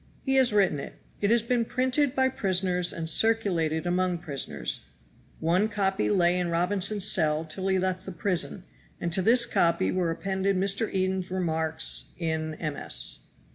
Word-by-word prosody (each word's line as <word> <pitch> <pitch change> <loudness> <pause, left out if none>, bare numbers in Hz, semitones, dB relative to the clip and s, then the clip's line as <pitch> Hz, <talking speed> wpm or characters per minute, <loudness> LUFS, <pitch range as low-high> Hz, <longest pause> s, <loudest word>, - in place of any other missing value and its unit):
He 270 - 0
has 260 -3 +4
written 195 -8 +2
it. - - -8 0.2
It 200 - 0
has 230 0 +3
been 235 0 0
printed 260 +3 0
by 260 0 +3
prisoners 185 -6 0
and 165 -1 -5
circulated 175 -5 +2
among 180 0 0
prisoners. 125 - -2 0.5
One 180 +6 +2
copy 195 -2 0
lay 180 -3 +2
in 175 -1 -1
Robinson's 190 +4 0
cell 155 -5 +2
till 190 +4 -5
he 190 0 +2
left 185 0 -2
the - - -4
prison, 180 +1 -1 0.4
and 170 -1 -3
to 190 - +1
this 235 +5 +4
copy 165 - +1
were 180 -2 0
appended 190 +3 -1
Mr. 200 +3 +1
Eden's 185 -1 -1
remarks 160 -3 0
in 160 -2 -3
MS. 155 -3 0
185 Hz, 160 wpm, -27 LUFS, 165-205 Hz, 0.5 s, has